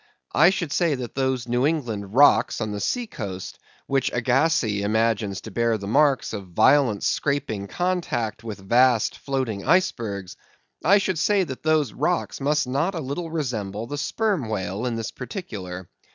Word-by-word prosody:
I 165 +4 +6
should 185 -5 -2
say 170 -5 +2
that 125 -2 -6
those 130 -2 -1
New 120 +1 +1
England 115 -10 -3
rocks 145 +2 +5
on 110 -2 -2
the 105 - -4
sea 245 - -1
coast, 95 - -7 0.3
which 135 -2 0
Agassiz 120 -4 +1
imagines 110 -2 0
to 110 - -9
bear 115 +1 +1
the 100 - -8
marks 135 +5 +2
of 100 -3 -6
violent 110 +4 +3
scraping 115 -9 -1
contact 165 - -2
with 110 -3 -6
vast 120 0 +4
floating 130 -7 -2
icebergs—I 135 - 0
should 190 -4 -1
say, 200 +2 +3
that 130 -7 -6
those 155 -6 +1
rocks 170 0 -1
must 150 +2 +1
not 145 +9 -1
a - - -2
little 155 +4 -4
resemble 115 -9 -3
the 145 +4 -5
Sperm 195 - -1
Whale 100 +2 -2
in 120 - -2
this 115 0 -4
particular. 95 - -7
125 Hz, 160 wpm, -24 LUFS, 110-155 Hz, 0.3 s, I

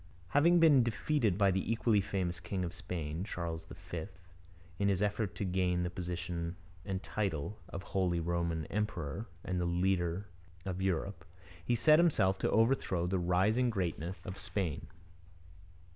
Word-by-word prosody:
Having 170 - +5
been 155 -5 +7
defeated 115 -3 +1
by 100 -2 +4
the 95 +3 -1
equally 115 -2 +3
famous 90 -3 -2
king 90 +1 -3
of 85 - -5
Spain, 80 -2 -4
Charles 85 -5 -4 0.2
V, 85 +1 -3 0.7
in 100 - +2
his 95 -2 +2
effort 105 -1 0
to 100 - -2
gain 90 -1 +1
the 90 - -2
position 85 -1 -4 0.3
and 95 -1 -3
title 100 -2 -2
of 95 - -6
Holy 90 -3 0
Roman 85 -1 -1
Emperor 100 0 -3 0.2
and 90 -1 -1
the - - 0
leadership 90 +1 +1 0.4
of 95 -1 -3
Europe, 95 -1 -1 0.4
he 120 - +1
set 155 +6 +6
himself 95 - +3
to - - +1
overthrow 110 -6 +2
the 95 +1 0
rising 95 +8 +3
greatness 90 -3 -2
of 95 +2 -6
Spain. 90 -9 -3
95 Hz, 150 wpm, -33 LUFS, 85-105 Hz, 0.7 s, been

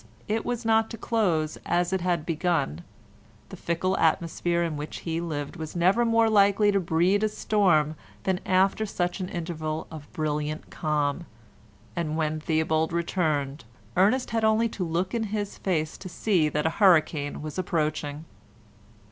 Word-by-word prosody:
it 220 +1 0
was 245 -1 -3
not 225 0 +3
to 230 - -7
close 175 -11 0
as 175 +1 0
it 190 - 0
had 175 -3 0
begun; 165 - 0 0.7
the - - -8
fickle 180 +3 -1
atmosphere 170 +1 +1
in 165 -2 -2
which 150 +1 -6
he 165 0 -2
lived 150 -2 -4
was 160 0 -6
never 185 +7 +3
more 230 -1 +3
likely 205 -1 +4
to 200 - +2
breed 175 +3 +2
a 215 - +2
storm 180 -9 +2 0.3
than 190 -1 0
after 190 +3 +2
such 180 -3 -2
an 185 -1 -3
interval 160 -2 -4
of 155 -2 -10
brilliant 155 -2 -3
calm, 150 +1 -1 0.7
and 155 -2 -2
when 155 -1 0
Theobald 160 0 +1
returned 155 -4 -1 0.3
Ernest 215 +8 +3
had 225 0 0
only 220 +1 +3
to 195 - -4
look 175 +3 -1
in 230 -2 0
his 205 -1 -4
face 160 -5 -1
to 185 - -8
see 175 -4 +1
that 150 +1 -1
a - - +4
hurricane 155 -6 +3
was 155 +3 -5
approaching. 155 -3 -2
170 Hz, 160 wpm, -26 LUFS, 155-195 Hz, 0.7 s, likely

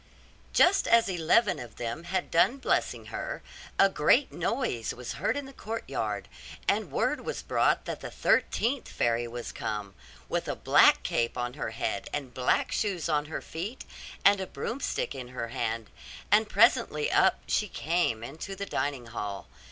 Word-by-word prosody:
Just 385 +2 +4
as 230 -2 +5
eleven 185 +4 +2
of 120 -3 -9
them 120 +8 -4
had 185 +1 -2
done 240 +10 +4
blessing 270 - 0
her, - - -4 0.3
a 195 - +7
great 195 - +3
noise 230 - -2
was 125 -1 -6
heard 205 - -1
in 285 - -4
the 270 - -11
courtyard, 225 -2 -4 0.4
and - - +1
word - - 0
was - - -4
brought - - +2
that - - -4
the - - -6
thirteenth 250 +3 +1
fairy 120 0 0
was 120 0 -6
come, 105 -2 -4 0.3
with - - -2
a - - -1
black - - +5
cap 115 0 0
on 120 0 -2
her - - -4
head, 115 +1 -3
and 135 -4 -4
black 125 0 +1
shoes 190 -7 -1
on 150 -1 +1
her 155 - -5
feet, 195 +10 -6 0.4
and 200 -1 +6
a 190 - -4
broomstick 255 - -3
in 130 -3 -7
her 125 -2 -5
hand: 115 -1 -3 0.4
and 210 +1 +5
presently 235 - +3
up - - +4
she 210 - +1
came 165 - 0
into 160 +10 -6
the 200 +1 -4
dining 140 -9 -2
hall. 105 -4 -5
160 Hz, 165 wpm, -29 LUFS, -, 0.4 s, a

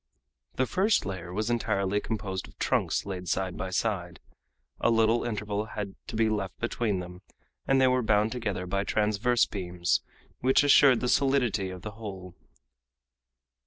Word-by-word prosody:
The 130 - +1
first 195 - +2
layer 95 -2 -5
was 110 +5 -1
entirely 100 -4 0
composed 100 -4 -4
of - - -19
trunks - - 0
laid 90 -2 -5
side 95 -1 -1
by 95 - -4
side. 95 -3 -2 0.6
A - - +2
little 115 0 +3
interval 105 -2 -2
had 105 -2 -5
to - - -6
be 110 0 +3
left 105 -3 -2
between 115 -3 -1
them, 90 +1 -10 0.5
and 135 0 +4
they 130 - +5
were 130 0 +3
bound 105 -1 +2
together 105 -7 -3
by 100 +2 -1
transverse 110 +4 +2
beams, 90 -3 -1 0.4
which 130 +3 +4
assured 140 -3 +6
the 125 - 0
solidity 125 -8 +2
of 90 -1 -9
the 105 - -5
whole. 95 -4 -8
105 Hz, 160 wpm, -28 LUFS, 95-120 Hz, 0.6 s, assured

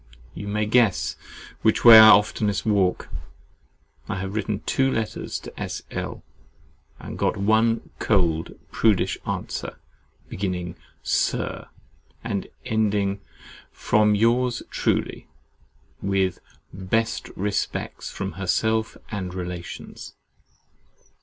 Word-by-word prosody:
You 100 - -7
may 105 +1 0
guess 110 -2 +2 0.5
which 110 - +2
way 115 -2 +12
I 110 0 +10
oftenest 105 0 +3
walk. 100 -4 +1 1.0
I - - -1
have 95 +1 -4
written 105 -1 -2
two 135 +3 +1
letters 110 -2 -3
to - - -11
S. - - -4
L. - - -5 0.8
and - - -8
got - - +1
one 110 +3 +2
cold, 85 -6 +1
prudish 110 -5 +2
answer, - - -4 0.5
beginning 90 -2 -4 0.3
SIR, - - -1 0.6
and 100 -4 -3 0.2
ending 105 -4 0 0.5
FROM 105 0 +2
YOURS 120 +3 +2
TRULY, - - -1 0.7
with 95 -2 0 0.3
BEST 100 +5 -1
RESPECTS 100 +1 -3
FROM 100 0 -4
HERSELF 110 +4 0
AND 95 -4 -4
RELATIONS. 90 -2 -7
105 Hz, 100 wpm, -24 LUFS, 95-110 Hz, 1.0 s, way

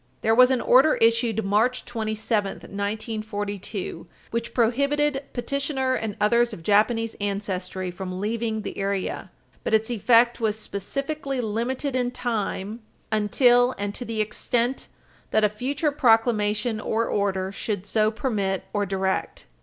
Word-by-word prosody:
There 225 - +3
was 250 +2 +7
an 260 -2 +1
order 270 +5 +5
issued 230 -1 +2
March 225 +6 +1
27, 215 -3 -1
1942, 205 -1 -4 0.2
which 235 0 -2
prohibited 280 +4 +1
petitioner 265 +1 -1
and 220 -4 -2
others 235 +2 +3
of 170 - -9
Japanese 225 +3 +2
ancestry 190 -2 -3
from 185 0 -6
leaving 220 +1 -2
the - - -6
area, 195 -1 -2 0.3
but - - +2
its 220 +2 +1
effect 235 +2 +4
was 220 -1 +1
specifically 275 +7 -3
limited 245 +5 -2
in 250 -1 +1
time 220 -3 -3 0.3
"until 245 +4 +4
and 200 0 -3
to 245 - -6
the 225 -2 -2
extent 235 +4 -1 0.4
that 215 - +2
a 210 - +5
future 275 +8 -1
proclamation 225 -4 +2
or 225 +2 0
order 190 -3 -1
should 200 -1 -4
so 215 0 +2
permit 210 -4 -1
or 205 -1 0
direct." 190 0 -2
220 Hz, 135 wpm, -25 LUFS, 205-245 Hz, 0.4 s, was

